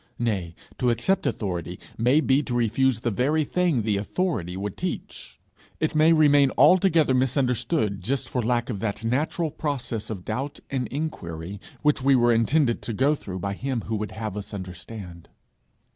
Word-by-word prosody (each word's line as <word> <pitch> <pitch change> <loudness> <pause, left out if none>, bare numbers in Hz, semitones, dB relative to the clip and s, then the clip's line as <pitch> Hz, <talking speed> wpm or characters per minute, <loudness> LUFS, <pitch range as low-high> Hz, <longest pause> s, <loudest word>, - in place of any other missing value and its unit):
Nay, 95 -8 -2 0.2
to 125 - +2
accept 120 - +1
authority 90 -3 -3 0.2
may 125 +7 +3
be 135 -1 +3
to 125 -4 -4
refuse 120 +1 +2
the 120 - 0
very 145 +9 +1
thing 165 -6 +1
the 105 -2 +1
'authority' 100 - -2
would 100 0 -4
teach; - - -6 0.4
it 155 +1 0
may 155 +1 +5
remain 145 -3 +5
altogether 170 -7 +5
misunderstood 125 -3 +1
just 130 +8 -1
for 125 - -1
lack 120 +1 0
of 105 - -4
that 105 +1 -3
natural 150 +7 0
process 135 -8 -3
of 95 -5 -6
doubt 140 +3 -3
and 130 -3 -1
inquiry, 100 - -5 0.2
which 150 -2 +3
we 135 +1 +4
were 120 -1 +4
intended 120 +3 +2
to 115 - -4
go 135 +7 +3
through 95 -10 -6
by 100 +2 -3
him 130 +3 -3
who 110 - -3
would 105 0 -4
have 110 -3 -5
us 105 0 -6
understand. 90 -1 -8
120 Hz, 170 wpm, -25 LUFS, 105-145 Hz, 0.4 s, may